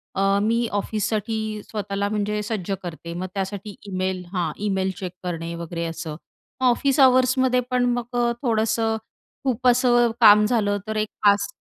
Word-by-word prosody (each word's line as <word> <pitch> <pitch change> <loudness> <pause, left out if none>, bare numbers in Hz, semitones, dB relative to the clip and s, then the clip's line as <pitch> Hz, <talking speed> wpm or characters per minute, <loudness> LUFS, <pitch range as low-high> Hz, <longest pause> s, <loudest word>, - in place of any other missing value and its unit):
अ, 195 - 0 0.2
मी 230 +2 +1
ऑफिससाठी 215 +1 -1 0.2
स्वतःला 200 -1 -3
म्हणजे 210 0 -1
सज्ज 205 -3 -4
करते, 170 -1 -7
मग 185 +2 -4
त्यासाठी 200 +1 -4
ईमेल 185 -1 -2
हां. 170 -4 0
ईमेल 190 -1 0
चेक 185 -2 -4
करणे 170 -1 -4
वगैरे 170 0 -4
असं. 165 -2 -5 0.5
मग 255 - +4
ऑफिस 275 +3 +1
अवर्समध्ये 255 -1 +4
पण 250 -1 +2
मग 245 0 -5
अ, 240 0 +2
थोडंसं 225 -2 +1 0.5
खूप 255 -1 0
असं 240 -1 +4
काम 210 -1 +8
झालं, 210 -3 +1
तर 220 - -3
एक 215 0 0 0.2
5 205 0 +5
210 Hz, 155 wpm, -23 LUFS, 190-235 Hz, 0.5 s, काम